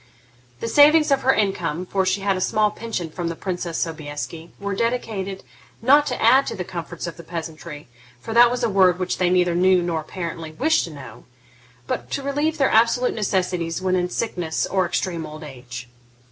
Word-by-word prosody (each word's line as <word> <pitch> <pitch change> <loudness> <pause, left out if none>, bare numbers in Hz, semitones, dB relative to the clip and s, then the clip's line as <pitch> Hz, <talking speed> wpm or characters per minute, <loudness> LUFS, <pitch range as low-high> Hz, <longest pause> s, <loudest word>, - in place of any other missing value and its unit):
The - - -2
savings 300 +4 +6
of 275 -1 +3
her 265 - +4
income, 180 -6 -1
for 190 0 0
she 195 +1 +1
had 195 0 +1
a 185 - -3
small 215 +2 +2
pension 210 -7 -5
from 175 +1 -4
the 165 - -3
Princess 175 -2 -4
Sobieski, 160 +1 -5
were 200 0 -3
dedicated, 205 -4 -2 0.4
not 285 +5 +5
to 250 - -2
add 260 +5 +5
to - - -3
the 180 - -4
comforts 175 -1 -6
of 170 - -6
the 170 - -10
peasantry, 160 -2 -7 0.3
for 225 - -6
that 240 +1 +7
was 245 0 -2
a - - +3
word 185 -2 +4
which 185 -1 -2
they 180 -1 +3
neither 180 -1 +3
knew 180 +1 +4
nor 165 -2 -1
apparently 165 -1 -6
wished 315 - +2
to - - -8
know, 130 -6 -11 0.6
but 120 0 -4
to 275 - -3
relieve 290 +3 -1
their 270 - +2
absolute 235 +3 +3
necessities 180 -5 -1
when 185 0 0
in 180 -1 0
sickness 180 -7 -2
or 190 -2 0
extreme 170 -1 -2
old 155 0 -9
age. 125 -3 -9
185 Hz, 195 wpm, -22 LUFS, 165-225 Hz, 0.6 s, that